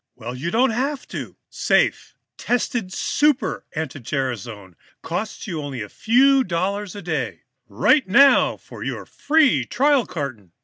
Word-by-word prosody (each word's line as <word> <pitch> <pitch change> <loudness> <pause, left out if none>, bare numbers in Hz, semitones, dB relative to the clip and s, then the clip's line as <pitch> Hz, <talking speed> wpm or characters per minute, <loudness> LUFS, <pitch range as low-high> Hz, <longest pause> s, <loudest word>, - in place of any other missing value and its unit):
Well, 120 0 -7
you 140 +7 -4
don't 240 +6 +2
have 270 +5 -2
to. - - -7
Safe, - - +1 0.2
tested 240 -5 -2
Super 295 +7 0
anti 150 -2 -4
gerasone 115 -7 -4 0.3
costs - - -4
you 160 -3 -4
only 135 -6 -5
a 105 - -10
few 265 +4 +3
dollars 195 +1 -2
a 200 - -8
day. 160 -6 -3 0.2
"Write 125 - +2
now 275 +8 +5
for - - -11
your - - -4
free 285 - +2
trial 275 - +2
carton. 120 - -6
180 Hz, 140 wpm, -22 LUFS, -, 0.3 s, now